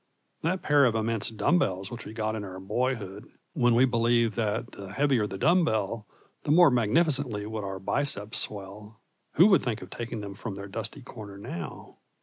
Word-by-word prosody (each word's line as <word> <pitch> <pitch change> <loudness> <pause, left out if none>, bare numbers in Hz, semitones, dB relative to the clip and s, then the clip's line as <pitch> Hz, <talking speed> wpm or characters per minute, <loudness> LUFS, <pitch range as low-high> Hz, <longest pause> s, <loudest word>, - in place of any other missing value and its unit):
That 180 +2 -1
pair 145 -4 +5
of 115 -2 +2
immense 110 -1 0
dumb 145 +10 +2
bells 95 - -1
which 120 - -7
we 105 - -8
got 110 -1 -2
in 105 - -4
our 95 -1 -7
boyhood, 105 -1 -2 0.2
when 120 -4 +3
we 125 +3 +6
believed 115 -2 +2
that 110 -2 -1
the 100 0 -9
heavier 135 -6 +2
the 95 - -6
dumb 175 - +4
bell 110 -4 -1 0.4
the - - -5
more 165 0 +7
magnificently 125 -2 +1
would 110 0 -4
our 95 -1 -4
biceps 105 0 0
swell 105 +2 -6 0.3
who 170 - +7
would 200 -3 +6
think 115 -4 -3
of - - -12
taking 115 -2 -5
them 100 -1 -6
from 100 0 -6
their 100 0 -7
dusty 110 +7 -5
corner 105 -5 -10
now? 85 -6 -8
110 Hz, 190 wpm, -28 LUFS, 105-125 Hz, 0.4 s, more